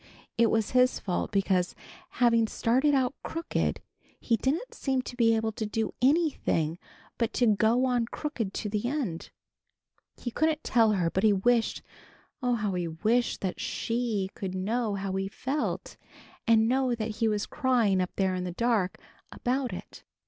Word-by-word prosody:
It 230 -1 +4
was 225 -2 +1
his 255 0 +3
fault 180 -3 -2
because, 190 -2 +1 0.3
having 230 -2 +3
started 260 +7 +2
out 260 -1 +1
crooked, 330 +1 -2 0.4
he 230 - +1
didn't 285 - -1
seem 265 -2 -1
to 245 - -7
be 230 -2 +4
able 220 0 0
to 220 0 -4
do 220 0 -2
anything 260 - +2 0.4
but 230 -2 0
to 245 - +2
go 225 +6 +3
on 245 -2 +1
crooked 245 -8 -4
to 210 - -4
the 210 +2 -1
end. 245 - -3 0.9
He 240 - -5
couldn't 315 +3 0
tell 225 -3 +3
her, 175 -4 +1
but 190 - -1
he 215 - +6
wished, 230 +4 +1 0.6
oh, 250 -1 +2
how 210 -3 -1
he 175 -1 -1
wished, 220 +9 0
that 190 -2 -3
She 230 -5 -2
could 190 -1 -5
know 215 +3 -1
how 195 -1 -3
he 195 0 -1
felt, 270 +8 -3 0.5
and 225 -1 +5
know 255 0 +2
that 220 -1 -4
he 225 - +2
was 210 -1 0
crying 230 -8 +2
up 180 - -1
there 190 -1 +1
in 180 0 -2
the 180 - -3
dark 220 -3 +1 0.3
about 255 0 -1
it. - - -9
230 Hz, 170 wpm, -28 LUFS, 195-250 Hz, 0.9 s, he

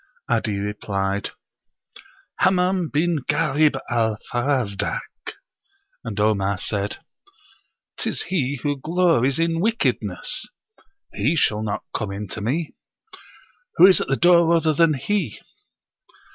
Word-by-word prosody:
'Adi 110 -3 0
replied, 100 -1 -2 1.1
"Hammam 185 -2 +2
bin 165 +2 +1
Ghalib 150 0 +2
al 115 -3 0 0.2
Farazdak." 120 -6 0 1.0
And 110 -4 -5
Omar 100 -2 +1
said, 100 +1 -3 1.0
"Tis - - -1
he 140 -7 -1
who 145 -1 -1
glories 160 -6 +2
in 165 0 0
wickedness.... 225 +5 -1 0.7
He 125 +11 +1
shall 110 -9 +2
not 105 -2 -3
come 105 -3 -2
in 100 +1 -5
to 105 - -6
me! 150 +9 -2 1.0
Who - - +8
is 190 -1 +6
at - - -3
the 135 - +1
door 170 +1 +5
other 160 -1 +2
than 160 0 +3
he?" 155 - -2
135 Hz, 115 wpm, -22 LUFS, 105-165 Hz, 1.1 s, Who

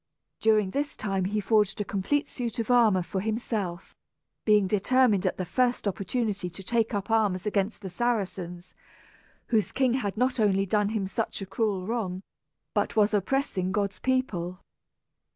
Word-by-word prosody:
During 215 -3 +3
this 285 +4 -2
time 195 -3 -1
he 210 +3 0
forged 210 0 +2
a 205 - -1
complete 200 +10 0
suit 235 -3 -4
of 230 +1 -1
armor 220 -7 +5
for 190 +2 -3
himself, 210 -4 -3 0.5
being 210 -2 +5
determined 210 +1 +3
at - - -1
the 185 - -2
first 245 +4 +1
opportunity 200 0 -2
to 185 +3 -9
take 230 +3 +1
up 200 +2 -3
arms 205 -4 +2
against 205 0 -1
the 190 - -6
Saracens, 185 -5 -2 0.8
whose 215 -6 +2
king 260 -2 +2
had 215 -6 -2
not 250 +1 +1
only 195 -2 +3
done 205 +1 +1
him 215 -3 -1
such 215 +4 -2
a 195 - -5
cruel 195 -2 -1
wrong, 195 -4 -3 0.5
but - - 0
was 215 -1 +3
oppressing 200 -3 0
God's 200 -1 -1
people. 190 -9 -1
210 Hz, 160 wpm, -27 LUFS, 190-230 Hz, 0.8 s, armor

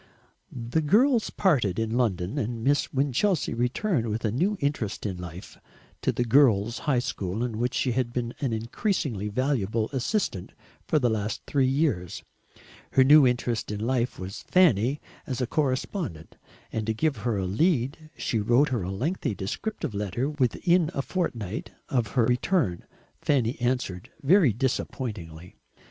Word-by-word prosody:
The 120 +6 -2
girls 230 - +3
parted 125 - +1
in 115 0 -1
London, 105 -1 0
and 115 -2 -3
Miss 145 +3 +2
Winchelsea 140 - +1
returned, 125 - 0
with 110 +2 -2
a 105 - +1
new 185 - 0
interest 140 -10 -2
in 95 -3 -2
life, 90 +1 -9 0.4
to - - +1
the 120 - 0
Girls' 115 -3 +4
High 135 - +3
School 105 -3 -2
in 115 -3 -3
which 120 +1 0
she 130 - +1
had 120 0 -1
been 120 -1 -3
an 135 -4 -1
increasingly 115 - -1
valuable 115 -2 0
assistant 135 - -1 0.3
for - - +2
the 125 -5 +2
last 105 -1 -2
three 135 -3 +2
years. 130 - 0 0.7
Her 130 - +6
new 145 0 +7
interest 120 -2 -1
in 105 - -3
life 120 +2 0
was 95 +1 -6
Fanny 145 - +3 0.3
as 130 -3 -3
a 125 - +1
correspondent, 130 - -2 0.4
and 110 -1 -2
to 110 - 0
give 150 +2 0
her 110 0 -1
a 95 - -1
lead 140 - 0
she 115 - -1
wrote 120 +8 +3
her 120 -5 -1
a 90 - -4
lengthy 120 - -2
descriptive 110 - -4
letter 105 +6 -2
within 155 +5 +2
a 135 - -1
fortnight 115 - -3 0.2
of 120 -4 +1
her 120 - +5
return. 125 - +1 0.4
Fanny 125 -5 +1
answered, 120 -8 -1
very 165 - +5
disappointingly. 100 - -4
120 Hz, 155 wpm, -26 LUFS, 105-145 Hz, 0.7 s, new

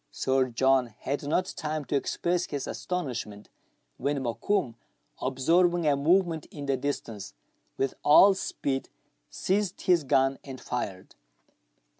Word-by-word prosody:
Sir 130 - +1
John 125 -1 +2
had 140 +1 -2
not 180 +5 0
time 155 -1 -3
to 145 - -2
express 175 +5 0
his 145 -2 -4
astonishment, 125 - -4 0.5
when 140 0 -1
Mokoum, 125 - -1 0.5
observing 170 +7 +2
a 145 -2 +4
movement 165 +2 +2
in 145 -1 -7
the 135 -1 +1
distance, 115 - -5 0.4
with 135 - 0
all 190 +7 +7
speed 140 -7 -3 0.4
seized 195 0 -1
his 175 -4 +3
gun 135 0 +2
and 135 -2 -8
fired. 100 -7 -5
140 Hz, 125 wpm, -28 LUFS, 130-170 Hz, 0.5 s, all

